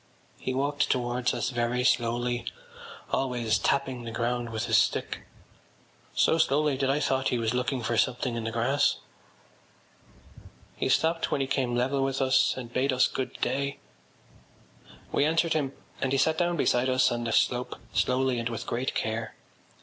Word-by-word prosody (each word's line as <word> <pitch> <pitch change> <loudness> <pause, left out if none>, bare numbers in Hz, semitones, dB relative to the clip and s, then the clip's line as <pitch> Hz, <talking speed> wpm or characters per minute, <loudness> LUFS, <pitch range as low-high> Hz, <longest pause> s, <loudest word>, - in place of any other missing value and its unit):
He - - -3
walked 145 +2 0
towards 125 -1 0
us 120 +1 -2
very 120 0 0
slowly, 120 0 +1 0.7
always 120 -5 0
tapping 135 -3 0
the 115 - -5
ground 120 +1 -2
with 110 -1 -3
his - - +4
stick, - - -1 0.9
so 165 - +3
slowly 150 -1 +2
that 135 0 0
I 140 +2 +2
thought 135 -2 +1
he 125 - +1
was 115 0 0
looking 125 0 -1
for 120 +1 0
something 125 0 +1
in 115 - -3
the 115 - -2
grass. 120 +5 +2 1.8
He - - -1
stopped 165 +4 +2
when - - 0
he 135 - +1
came 130 -2 -1
level 135 +3 +1
with 135 0 -1
us 130 -1 +3
and 120 -2 -7
bade 135 +2 +1
us 130 0 +4
good 130 - -5
day. 140 0 -1 1.3
We - - +2
answered 165 +2 +2
him 145 -4 0 0.3
and 135 - 0
he 135 - +2
sat 160 +4 +3
down 175 -1 +1
beside 125 -2 +2
us 130 0 +3
on 120 0 -2
the 115 - -2
slope 125 +2 +1 0.2
slowly 130 -1 +1
and 115 0 -2
with 115 0 -5
great 125 +3 -2
care. 110 +1 -2
130 Hz, 170 wpm, -27 LUFS, 120-135 Hz, 1.8 s, his